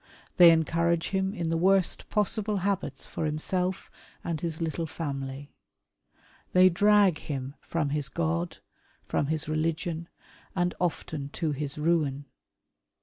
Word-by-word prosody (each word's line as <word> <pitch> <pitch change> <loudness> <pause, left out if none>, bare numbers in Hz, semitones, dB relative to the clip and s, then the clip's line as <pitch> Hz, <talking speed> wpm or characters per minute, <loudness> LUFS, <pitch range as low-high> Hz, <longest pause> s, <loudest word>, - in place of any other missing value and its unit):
They 175 -2 +10
encourage 165 +1 +2
him 190 +1 -1
in 165 -4 -2
the 165 - +1
worst 190 +1 +2
possible 210 0 0
habits 185 -9 -1
for - - -4
himself 180 +4 -1 0.3
and 165 -3 -3
his 165 -2 -3
little 165 0 -2
fiimily. 140 -2 -5 1.0
They 185 +1 +7
drag 200 -1 +4
him 135 -2 -5
from 160 -4 -1
his 145 -1 -1
God, 85 -3 -1 0.5
from 140 - 0
his 155 0 -1
religion, 160 +2 -2 0.5
and 175 -1 +1
often 155 -4 -2
to 160 -3 -1
his 145 0 -4
ruin. 150 -3 +1
165 Hz, 130 wpm, -28 LUFS, 145-180 Hz, 1.0 s, They